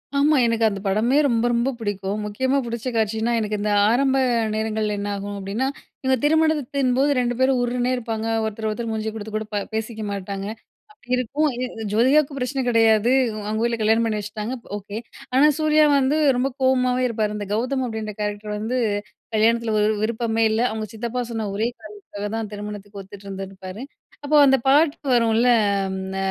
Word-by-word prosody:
ஆமா. 295 +2 +4
எனக்கு 230 -1 +2
அந்த 200 -1 -5
படமே 225 +8 +2
ரொம்ப 235 -1 +1
ரொம்ப 235 +3 +1
பிடிக்கும். 205 -1 -3
முக்கியமா 260 +6 0
புடிச்ச 235 +1 -5
காட்சினா 220 +2 0
எனக்கு 210 -1 -2
இந்த 210 0 0 0.2
ஆரம்ப 265 +3 +2 0.4
நேரங்கள்ல 215 -1 -1
என்ன 205 0 -3
ஆகும் 200 0 -5
அப்டின்னா, 205 +7 -2 0.4
இவுங்க 260 0 +2
திருமணத்தின்போது 285 -4 +2
2 245 -1 0
பேரும் 260 -1 +3
உர்ருனே 245 +1 0
இருப்பாங்க, 225 -2 -3 0.2
ஒருத்தர் 220 0 -3
ஒருத்தர் 230 +1 -3
மூஞ்சி 220 0 -2
கொடுத்து 215 0 -7
கூட 215 0 -2
ப - - 0 0.2
பேசிக்க 220 0 -3
மாட்டாங்க. 195 0 -4 0.5
அப்டி 250 -12 -24
இருக்கும் 280 +5 0 0.5
ஜோதிகாவுக்கு 275 +5 +3
பிரச்சனை 265 +1 -2
கெடையாது. 225 0 +4 0.4
அவங்க 220 +2 -1
ஊர்ல 235 -1 0
கல்யாணம் 225 +2 +3
பண்ணி 215 -2 -1
வச்சுட்டாங்க 210 +4 -5 0.2
ஓகே. 205 +1 -7 0.4
ஆனா 280 +4 +6
சூர்யா 310 0 +4
வந்து 270 +3 +2 0.2
ரொம்ப 265 +2 +1
கோவமாவே 255 -1 +2
இருப்பாரு. 215 -2 -1
இந்த 205 -2 -5
"கௌதம்" 255 +4 0
அப்படின்ற 220 -2 -5
கேரக்டர் 210 0 -3
வந்து 235 +4 -2 0.6
கல்யாணத்துல 225 +1 +2
ஒரு 210 +1 +3
விருப்பமே 225 0 0
இல்ல 220 +2 +1
அவுங்க 220 0 -4
சித்தப்பா 235 +2 -3
சொன்ன 220 -2 -3
ஒரே 220 +3 +1
காரணத்துக்காக 205 -1 -8
தான் 220 -2 -4
திருமணத்துக்கு 205 -1 -7
ஒத்துட்டு 195 +1 -13
இருந்துருப்பாரு. 195 +1 -7 0.4
அப்போ 300 +1 +1
அந்த 270 0 +5
பாட்டு 290 +1 +3
வரும்ல, 230 +1 +3 0.4
அம். 190 0 -4 0.2
த - - -3
225 Hz, 165 wpm, -22 LUFS, 210-255 Hz, 0.6 s, ஆனா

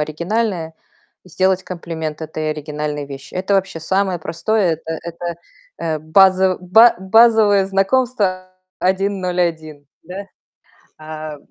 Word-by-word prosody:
оригинальное, 170 +3 -2 0.5
и - - -16
сделать 185 +2 +1
комплимент 160 -3 -6
этой 155 0 -3
оригинальной 150 -1 -4
вещи. 140 0 -10
Это 190 +2 0
вообще 190 -4 -1
самое 190 +2 0
простое. 185 +3 0
Это 160 0 -4
это, 170 0 -5 0.4
э, 160 -2 -2
базо 185 +3 +4
ба 220 +6 +6
базовое 210 0 +4
знакомство 195 -2 0 0.3
101, 180 -6 -1 0.2
да? 190 +4 -7 0.7
А, 155 -1 -7
180 Hz, 110 wpm, -19 LUFS, 155-195 Hz, 0.7 s, ба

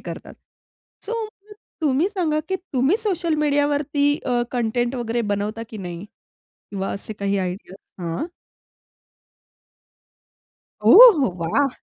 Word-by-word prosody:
करतात. - - -9 0.7
सो, 445 - -4
मग 425 -1 -14 0.3
तुम्ही 295 +5 +2
सांगा, 345 -7 -1
की 380 - 0 0.2
तुम्ही 270 - +2
सोशल 350 -6 0
मीडियावरती 290 -1 +1
अ, 245 -2 +1
कंटेंट 240 +1 -1
वगैरे 240 -1 -2
बनवता 210 +3 -4
की 220 - -8
नाही? 175 -1 -7 0.7
किंवा 195 -1 -3
असे 205 +2 -6
काही 200 -1 -2
आयडियाज? 185 0 -5 0.3
हां. 170 - -3 2.7
ओहो, 405 - +9
वाह! 275 +13 +1
265 Hz, 110 wpm, -22 LUFS, 205-310 Hz, 2.7 s, ओहो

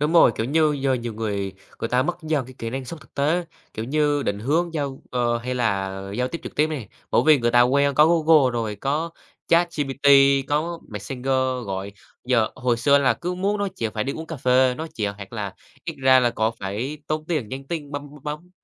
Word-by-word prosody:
Đúng 150 +3 +1
rồi, 165 -8 +6
kiểu 110 - -1
như 155 +2 +3
giờ 135 -1 +2
nhiều 120 -3 -4
người 100 -3 -3 0.3
người 115 - -2
ta 125 +2 +2
mất 175 +5 -2
dần 155 -4 0
cái 130 - -12
kỹ 115 0 -4
năng 130 +1 -4
sống 165 +5 -7
thực 125 - -20
tế, 155 +5 +1 0.3
kiểu 110 - -4
như 145 +1 +1
định 100 -4 -1
hướng 160 +9 0
giao 140 -3 -3
ờ, 120 -1 +1
hay 125 +2 -4
là 100 -6 0 0.2
giao 125 +3 0
tiếp 170 - -6
trực - - -8
tiếp 150 - +4
nè, 145 -10 -5 0.2
bởi - - +4
vì 155 -2 +7
người 120 -1 +1
ta 120 +1 +6
quen 140 +3 +3
có 150 +3 +6
Google 160 -5 +4
rồi, 110 -3 -2
có 150 +8 -1 0.4
ChatGPT, 145 -5 +1 0.4
có 165 +3 -1
Messenger 115 +5 -7 0.4
gọi, 95 +1 -4 0.3
giờ 120 -3 +2
hồi 125 -2 0
xưa 140 +4 +4
là 130 -4 +3
cứ 175 +8 -4
muốn 200 +3 0
nói 200 -1 -1
chuyện 110 -2 -2
phải 105 - -1
đi 140 - -2
uống 160 +2 -7
cà 160 - -6
phê 130 0 +3
nói 160 +4 -5
chuyện, 105 -2 -1
hoặc 100 +2 -10
là 100 -4 -4 0.3
ít - - -4
ra 130 0 +6
là 120 - +2
có 110 -1 0
phải 110 +10 -4
tốn 155 0 -2
tiền 150 -11 -1
nhắn 135 +2 -7
tin 150 -4 -4
bấm 145 0 -5
bấm 145 -1 -15
bấm. 150 +4 -6
135 Hz, 230 wpm, -23 LUFS, 115-155 Hz, 0.4 s, vì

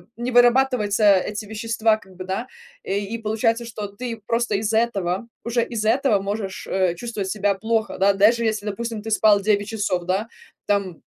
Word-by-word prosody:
не 240 +2 -3
вырабатывается 240 -4 +4
эти 210 +3 -3
вещества 220 +1 0
как 190 -3 -18
бы 185 - -7
да, 190 +6 -3 0.4
э, 195 - -2
и 205 +3 -4
получается, 225 +1 0
что 215 -2 -6
ты 230 +4 -6
просто 230 -2 0
из 210 +2 -1
этого 220 -3 0 0.2
уже 235 0 0
из 220 -3 -4
этого 225 -2 +3
можешь, 200 -1 -4
э, 185 -2 +1
чувствовать 210 -2 -4
себя 205 -1 +1
плохо, 220 +3 -1
да. 200 +1 +4
Даже 215 +4 +4
если, 215 -1 -1
допустим, 225 +2 -4
ты 225 - -6
спал 210 -1 +5
9 205 0 +1
часов, 200 -5 -1
да, 190 +5 -1 0.4
там 200 -4 0
215 Hz, 180 wpm, -22 LUFS, 200-230 Hz, 0.4 s, спал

